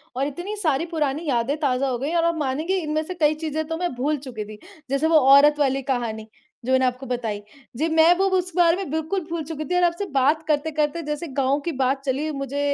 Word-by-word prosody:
और 270 +2 0
इतनी 350 +9 -5
सारी 310 -1 +1
पुरानी 300 +1 -1
यादें 250 +1 +1
ताज़ा 270 -2 +1
हो 250 - -1
गई 280 +7 -3
और 335 - +3
आप 335 0 +1
मानेंगे 300 +6 -1
इनमें 310 0 -1
से 365 - -6
कई 310 -4 +2
चीज़ें 310 +1 -1
तो 325 - -3
मैं 355 -2 -2
भूल 290 +4 0
चुकी 220 -4 -5
थी। 210 0 -11 0.3
जैसे 275 +3 +1
वो 320 -1 +5 0.2
औरत 295 +1 +5
वाली 270 -1 +1
कहानी, 235 -5 -3 0.4
जो 260 - -1
मैंने 260 0 +4
आपको 255 +1 -2
बताई, 230 -5 -3 0.4
जी, 315 +5 +1
मैं 320 +2 +6
वो 390 - +2
उस 365 0 -2
बारे 345 -2 +5
में 390 -4 -5
बिल्कुल 320 +5 -1
भूल 335 -1 -3
चुकी 310 -1 -5
थी 360 - 0
और 360 - +3
आपसे 345 +3 +1
बात 285 +4 +2
करते-करते, 305 +1 0
जैसे 300 +3 -3
गाँव 275 0 0
की 340 - 0
बात 265 +1 +1
चली, 280 +4 -1
मुझे 275 -1 -4
295 Hz, 230 wpm, -23 LUFS, 265-325 Hz, 0.4 s, मैं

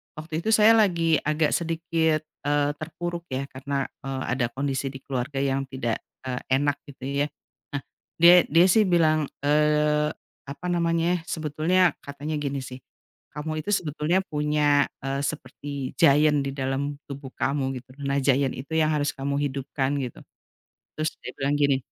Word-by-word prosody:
"Waktu 155 +1 -4
itu 195 - -2
saya 215 +1 +7
lagi 170 -6 +3
agak 155 0 +1
sedikit, 165 -2 0 0.2
eee, 145 0 +2
terpuruk 170 +2 -5
ya, 130 +1 -2
karena, 135 +1 -2 0.2
eee, 135 -1 -3
ada 125 0 +1
kondisi 135 0 -1
di 135 0 -8
keluarga 135 +1 -3
yang 135 0 0
tidak, 130 -4 -2 0.2
eee, 125 -1 -3 0.2
enak," 145 0 +1
gitu 135 -2 -13 0.2
ya. - - -4 0.5
Nah, 140 - -2 0.4
dia 175 +1 +8
dia 165 +4 +5
sih 220 +3 +5
bilang, 155 -4 +3 0.2
eee, 150 +1 +3 0.4
apa 140 +6 -8
namanya, 170 0 +1
sebetulnya 160 +4 +2
katanya 145 +2 -4
gini 140 -1 -2
sih, 130 0 -8 0.6
"Kamu 155 +1 -3
itu 155 - -8
sebetulnya 160 +2 0
punya, 150 -3 +2 0.2
eee, 135 0 -1
seperti 140 -1 -5
giant 150 +1 +5
di 135 - -2
dalam 135 +1 -2
tubuh 140 -1 -8
kamu," 135 -1 -1
gitu. 130 - -59 0.2
"Nah, 140 0 +1
giant 135 0 +2
itu 140 +5 -8
yang 155 0 +3
harus 145 -1 +1
kamu 140 +1 -2
hidupkan!" 135 0 -1
Gitu. 125 -3 -5 0.8
Terus 155 0 -1
dia - - -6
bilang 140 +1 0
gini 140 -2 +4
145 Hz, 155 wpm, -25 LUFS, 135-160 Hz, 0.8 s, dia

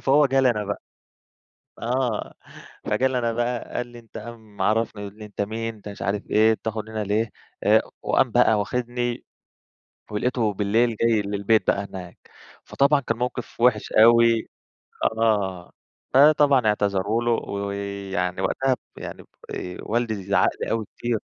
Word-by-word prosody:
فهو 140 +2 +4
جه 135 0 +2
لي 130 - +4
أنا 105 -3 -2
بقى. 100 0 -4 1.0
آه، 120 -2 -1 0.5
فجه 130 - +2
لي 130 -1 -1
أنا 115 -1 0
بقى 120 +1 -2
قال 120 0 -2
لي: 120 0 -12
"أنت" 115 -1 -12
قام 110 -2 -10
عرفني، 110 -1 +1
يقول 100 0 -8
لي: 105 - -7
"أنت 105 -1 -5
مين؟ 115 +2 -3
أنت 105 -1 -10
مش 100 - -9
عارف 100 +1 -1
إيه، 110 +1 +5
بتاخد 110 0 -4
من - - -13
هنا 110 -1 -2
ليه؟" 105 +2 0 0.3
آآ، - - +5 0.2
وقام - - +2
بقى 110 -2 +4
واخدني 120 +2 -2 0.9
ولقيته 110 0 0
بالليل 110 +3 +1
جاي 115 -2 +3
للبيت 100 0 +1
بقى 100 - +1
هناك. 90 -3 -9 0.5
فطبعًا 140 +1 +3
كان 115 -4 -2
موقف 125 -1 -4
وحش 120 -3 +2
أوي، 115 0 +5 0.7
آه، 100 -6 0 0.4
فطبعًا 140 -2 +5
اعتذروا 105 +2 +1
له 120 - +1
ويعني 100 -3 -3
وقتها 130 +7 +1 0.2
يعني - - -8 0.3
آآ، 90 0 -6
والدي 110 -3 -1
زعق 100 +1 +3
لي - - -2
أوي 115 -1 -1
كتير. 120 -2 -1
110 Hz, 155 wpm, -24 LUFS, 100-120 Hz, 1.0 s, إيه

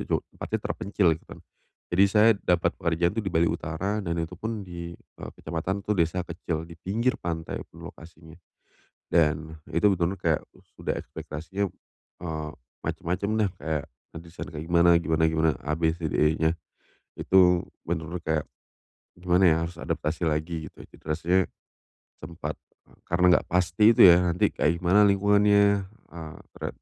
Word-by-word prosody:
jo - - +1 0.2
tempatnya - - -3
terpencil, 100 -2 -1
gitu - - -21
kan. - - -10 0.5
Jadi 95 +3 +5
saya 105 +2 +6
dapat 90 -1 +1
pekerjaan 85 +1 0
itu 115 - 0
di 95 - -3
Bali 85 0 +3
Utara, 95 +7 -2
dan 85 -2 -2
itu 80 +2 -5
pun 110 +3 -4
di, 85 -1 -7
eee, - - -12
kecamatan 85 +5 -3
itu 105 - 0
desa 85 +1 +1
kecil 85 -2 -4
di 85 - -11
pinggir 115 +9 -1
pantai 80 -2 -4
lokasinya. 80 0 -13 0.7
Dan, 80 -2 +2 0.2
itu 85 +5 +3
benar-benar 90 +1 -1
kayak 80 -2 +2 0.4
sudah - - -2
ekspektasinya, 85 +6 -5 0.6
eee, 80 -3 -4 0.4
macem-macem 90 +4 -2
dah 105 -3 +2
kayak, 75 0 -2 0.3
nanti 85 +1 -9
saya 85 - -8
kayak 75 +1 -5
gimana 85 0 +5
gimana 80 -1 +1
gimana, 80 0 +2 0.2
A 75 - 0
B 80 0 +1
C 85 -1 -4
D - - -7 0.2
E-nya. 80 +1 +1 0.6
Itu 90 -2 +4 0.2
benar-benar 85 +1 -3
kayak, 80 -2 0 0.7
gimana 90 +1 +2
ya, 80 - +4
harus 85 +1 -8
adaptasi 80 +1 -3
lagi 80 0 -3
gitu. - - -14
Jadi - - -20
rasanya, 85 +4 +2 0.8
sempat, 80 -2 -7 0.2
e - - -29 0.2
karena 85 +1 +1
enggak - - -11
pasti 90 +5 +3
itu - - +6
ya, 85 - +7
nanti 85 - +1
kayak 80 +3 +1
gimana 100 +4 +5
lingkungannya, 100 0 +4
eee, 85 -6 -12 0.2
tera - - -4
85 Hz, 160 wpm, -26 LUFS, 80-95 Hz, 0.8 s, ya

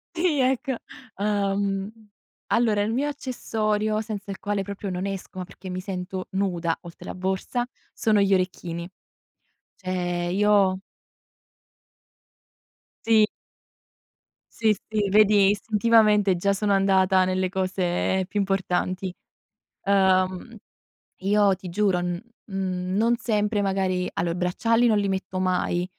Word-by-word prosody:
Sì, 330 -4 +1
ecco. 265 +1 +1 0.4
Uhm, 200 0 -1 0.6
allora, 220 -3 +3
il 220 +2 -1
mio 280 +4 0
accessorio 215 -6 -1
senza 210 -2 -6
il 195 - -4
quale 205 -1 -1
proprio 200 0 -5
non 180 +2 -3
esco, 190 -1 -6
ma - - -3
perché 185 +1 -11
mi 185 - -3
sento 185 0 -5
nuda, 175 -4 0
oltre 170 -2 -12
la - - -5
borsa, 190 +6 -2 0.3
sono 215 -2 +2
gli 200 0 +2
orecchini. 180 -2 -1 0.9
Cioè, 175 -2 -2
io 200 -2 +3 2.3
Sì. 220 -2 +5 1.3
Sì, 220 -2 +3 0.2
sì, 210 -2 0
vedi 205 -1 +5
istintivamente 210 -1 +3
già 200 +3 +1
sono 200 0 +1
andata 190 -1 +4
nelle 185 0 0
cose 185 0 0
più 210 - -4
importanti. 190 -1 -1 0.7
Uhm, 190 +2 +2 0.6
io 200 +1 +3
ti 185 0 -10
giuro, 185 0 +1
n 175 0 -3 0.2
uhm, 185 -2 -3
non 230 +3 +2
sempre 210 -2 0
magari 190 -2 0
allò 170 0 -1
i 170 - -3
bracciali 225 +7 +2
non 215 -2 +3
li 200 -1 0
metto 190 -1 -3
mai, 180 -1 0
195 Hz, 125 wpm, -25 LUFS, 185-210 Hz, 2.3 s, Sì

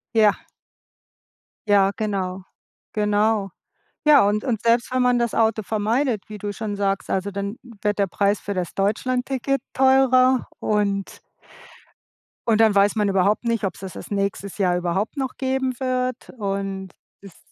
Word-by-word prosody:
Ja. 210 -2 +3 1.2
Ja, 200 -2 +5
genau. 195 -4 -3 0.5
Genau. 210 -1 +1 0.6
Ja, 285 -9 +7
und 210 +1 0
und 230 -5 -1
selbst 235 +2 +2
wenn 255 - +2
man 250 0 +3
das 235 -2 0
Auto 220 -1 +2
vermeidet, 220 +3 0
wie 210 -1 -8
du 205 +1 -4
schon 210 0 -4
sagst, 195 -1 -1
also 190 +1 -1
dann 200 +3 -4 0.2
wird 210 -1 0
der 200 - +4
Preis 200 +2 +1
für 200 - -4
das 180 -3 -3
Deutschlandticket 255 +6 0
teurer 260 -1 +4
und 200 -2 -1 1.3
und 225 -1 +4
dann 220 -2 +4
weiß 200 +2 +4
man 210 -2 +1
überhaupt 195 +3 +2
nicht, 230 -2 -1
ob's 195 - -3
das 190 -1 -7
das - - -10
nächstes 200 -1 -2
Jahr 180 -2 +2
überhaupt 180 - -2
noch 265 -2 -3
geben 265 -1 -1
wird 255 -1 -2
und 195 -2 -3 0.3
ist 195 -4 -14
210 Hz, 150 wpm, -23 LUFS, 200-245 Hz, 1.3 s, Ja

